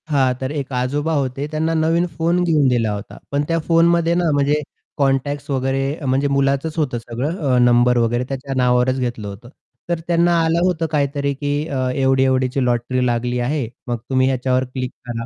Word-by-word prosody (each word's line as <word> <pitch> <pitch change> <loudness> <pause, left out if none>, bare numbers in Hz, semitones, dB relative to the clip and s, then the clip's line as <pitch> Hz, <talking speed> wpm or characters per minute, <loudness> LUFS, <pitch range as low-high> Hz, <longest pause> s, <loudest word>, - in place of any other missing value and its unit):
हां, 135 -4 +2
तर 130 +1 -3
एक 140 -3 -4
आजोबा 145 +6 -1
होते 135 -1 -1
त्यांना 160 +1 0
नवीन 165 +2 +2
फोन 170 +2 +1
घेऊन 155 -5 +3
दिला 120 -4 +1
होता. 100 +1 -8
पण 140 +1 +1
त्या 165 0 +1
फोनमध्ये 170 0 +3
ना, 175 -1 +1
म्हणजे 145 +1 +2 0.4
कॉन्टॅक्ट्स 140 +1 0
वगैरे 135 0 0 0.2
म्हणजे 135 +2 +1
मुलाचंच 140 +3 0
होतं 145 -6 0
सगळं 120 +8 -4 0.2
अ, - - +4
नंबर 120 0 +4
वगैरे 120 +1 +1
त्याच्या 135 0 -4
नावावरच 125 +1 +2
घेतलं 120 -4 -3
होतं. 100 +4 -9 0.4
तर 170 -1 0
त्यांना 170 0 +3
आलं 165 +1 +2
होतं 170 -3 0
काहीतरी 140 -1 0
की 145 +1 -3
अ, 130 -4 -1
एवढी-एवढीची 130 0 +2
लॉटरी 125 +1 0
लागली 120 0 0
आहे. 130 +1 -1 0.2
मग 120 -1 -1
तुम्ही 130 -1 +2
ह्याच्यावर 130 0 +1
क्लिक 130 -1 -3 0.2
करा. 115 -1 -4
135 Hz, 175 wpm, -20 LUFS, 125-150 Hz, 0.4 s, अ